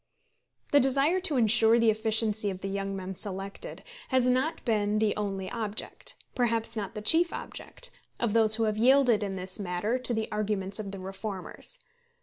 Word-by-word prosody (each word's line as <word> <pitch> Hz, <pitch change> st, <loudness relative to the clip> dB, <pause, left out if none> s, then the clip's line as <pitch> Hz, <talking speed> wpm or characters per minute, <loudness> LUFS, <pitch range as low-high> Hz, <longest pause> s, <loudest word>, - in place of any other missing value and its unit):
The 285 Hz, -, +6 dB
desire 275 Hz, +7 st, +3 dB
to 330 Hz, -7 st, +1 dB
insure 225 Hz, 0 st, +4 dB
the 230 Hz, -1 st, +4 dB
efficiency 220 Hz, -1 st, +1 dB
of 190 Hz, -1 st, -6 dB
the 195 Hz, -, -3 dB
young 195 Hz, 0 st, -3 dB
men 190 Hz, 0 st, -5 dB
selected, 195 Hz, -, -5 dB, 0.2 s
has 260 Hz, -1 st, +2 dB
not 255 Hz, +6 st, 0 dB
been 210 Hz, -3 st, +1 dB
the 215 Hz, -1 st, +1 dB
only 195 Hz, -2 st, -3 dB
object 215 Hz, -1 st, -3 dB, 0.2 s
perhaps 230 Hz, -2 st, 0 dB
not 205 Hz, -3 st, -4 dB
the 210 Hz, -, -5 dB
chief 335 Hz, +9 st, +4 dB
object -, -, -6 dB, 0.3 s
of 235 Hz, -3 st, 0 dB
those 220 Hz, -1 st, +6 dB
who 225 Hz, -, 0 dB
have 215 Hz, -1 st, 0 dB
yielded 250 Hz, -1 st, +4 dB
in 195 Hz, -2 st, -2 dB
this 185 Hz, +1 st, -2 dB
matter 200 Hz, +6 st, -1 dB
to 255 Hz, -, +1 dB
the 220 Hz, -1 st, -1 dB
arguments 210 Hz, -2 st, -1 dB
of 205 Hz, -2 st, -4 dB
the 195 Hz, -, -7 dB
reformers. 195 Hz, -, -6 dB
215 Hz, 175 wpm, -28 LUFS, 200-240 Hz, 0.3 s, The